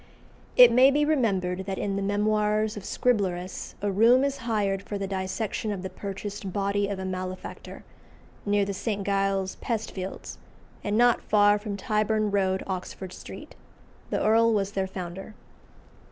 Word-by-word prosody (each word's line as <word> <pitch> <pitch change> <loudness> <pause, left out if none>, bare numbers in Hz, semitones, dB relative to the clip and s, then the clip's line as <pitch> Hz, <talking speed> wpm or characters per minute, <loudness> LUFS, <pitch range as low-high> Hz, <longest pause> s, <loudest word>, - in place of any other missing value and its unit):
It 245 -1 +10
may 255 +3 +7
be 295 +2 +2
remembered 190 -10 0
that 190 -1 -3
in 200 -1 -2
the 200 - -1
Memoirs 210 +1 +1
of 205 - -6
Scriblerus 190 -6 -1
a 205 - +1
room 230 +6 +5
is 280 0 0
hired 200 -3 0
for 205 - -5
the 200 - -3
dissection 195 +3 -3
of 195 -2 -4
the 190 - -5
purchased 200 0 -6
body 200 +1 0
of 200 -1 -3
a 190 - -5
malefactor, 185 0 -6 0.6
near 205 -1 +2
the 200 - -3
St. 200 0 -3
Giles's 195 -1 0
pest 225 -2 -3
fields, 190 0 -7 0.4
and 205 +1 0
not 240 0 +4
far 205 0 +4
from 205 -1 -5
Tyburn 215 +1 0
Road, 190 -1 +1
Oxford 185 0 -5
Street. - - -10 0.6
The - - 0
Earl 225 +1 +4
was 200 -1 0
their 195 -1 -1
founder. 190 +2 -7
200 Hz, 160 wpm, -26 LUFS, 190-215 Hz, 0.6 s, It